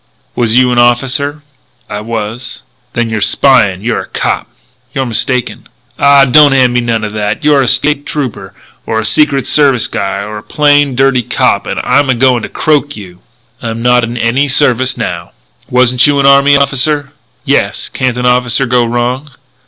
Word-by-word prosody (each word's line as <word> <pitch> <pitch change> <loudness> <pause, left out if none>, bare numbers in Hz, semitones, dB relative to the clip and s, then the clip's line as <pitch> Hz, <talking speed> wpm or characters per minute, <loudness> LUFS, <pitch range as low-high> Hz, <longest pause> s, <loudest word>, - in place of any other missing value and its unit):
"Was 115 -2 +1
you 125 -1 +3
an 120 - +1
officer?" 135 +5 0 0.4
"I 105 0 -6
was." 115 +2 -6 0.3
"Then 120 -1 -2
you're 110 -2 -3
spyin'. 100 -4 +2
You're 120 0 -2
a - - -11
cop." - - -3 0.5
"You're 135 - -1
mistaken." 125 +2 -2 0.3
"Ah, 140 -1 +5
don't 145 +1 +5
hand 130 -2 +2
me 120 - +1
none 115 -2 -2
like 105 - -4
that! 105 0 -3
You're 145 -2 +3
a 130 - -1
State 145 +2 +1
Trooper 135 -7 -5 0.3
or 110 - -1
a 110 - -4
Secret 140 +1 +2
Service 135 -5 +2
guy, 100 -3 -4
or 105 +1 -7
a - - -13
plain, 145 0 +1
dirty 135 -1 +2
cop. - - -1
And - - -3
I'm 135 +2 +1
a 130 - +2
going 125 0 +2
to - - -7
croak 145 -1 -1
you." 90 -3 -12 0.4
"I'm 115 0 -5
not 125 0 +3
in 120 +1 -4
any 120 +5 0
service, 130 -2 +1
now." - - -5 0.4
"Wasn't 125 +1 +3
you 145 -1 +1
an 140 - +1
army 140 +1 +5
officer?" 140 +1 0 0.3
"Yes. - - -1
Can't 130 -2 -3
an 125 - -3
officer 125 +1 +1
go 120 0 +1
wrong?" 120 +4 -3
125 Hz, 180 wpm, -11 LUFS, 115-140 Hz, 0.5 s, Ah